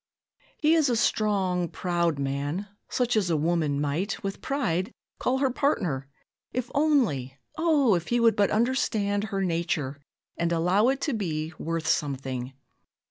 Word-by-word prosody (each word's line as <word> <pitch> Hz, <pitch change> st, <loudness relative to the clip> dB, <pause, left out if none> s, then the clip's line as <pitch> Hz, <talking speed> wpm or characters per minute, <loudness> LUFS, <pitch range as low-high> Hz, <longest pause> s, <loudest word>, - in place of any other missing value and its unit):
"He 310 Hz, +1 st, +3 dB
is 315 Hz, -5 st, +4 dB
a 240 Hz, -, +2 dB
strong, 195 Hz, -6 st, +1 dB
proud 170 Hz, -3 st, 0 dB
man, 140 Hz, +7 st, -2 dB, 0.2 s
such 245 Hz, -2 st, +1 dB
as 200 Hz, -5 st, +2 dB
a 165 Hz, -, +2 dB
woman 155 Hz, -2 st, +1 dB
might, 155 Hz, +10 st, -2 dB
with 195 Hz, 0 st, -4 dB
pride, 225 Hz, -, -1 dB, 0.3 s
call 255 Hz, +1 st, +1 dB
her 265 Hz, -1 st, +1 dB
partner 175 Hz, -, 0 dB, 0.5 s
'if 250 Hz, -1 st, -3 dB
only 240 Hz, -, +1 dB, 0.2 s
O! 305 Hz, -8 st, +3 dB
if 175 Hz, -1 st, -1 dB
he 240 Hz, -, +1 dB
would 230 Hz, -2 st, +4 dB
but 205 Hz, -2 st, +3 dB
understand 215 Hz, -3 st, +1 dB
her 195 Hz, -3 st, -2 dB
nature, 165 Hz, -5 st, -1 dB, 0.4 s
and 170 Hz, 0 st, 0 dB
allow 180 Hz, +6 st, +3 dB
it 270 Hz, +1 st, +1 dB
to 300 Hz, -, 0 dB
be 160 Hz, -6 st, -2 dB
worth 165 Hz, 0 st, -2 dB
something. 135 Hz, -4 st, -1 dB
185 Hz, 150 wpm, -27 LUFS, 155-240 Hz, 0.5 s, is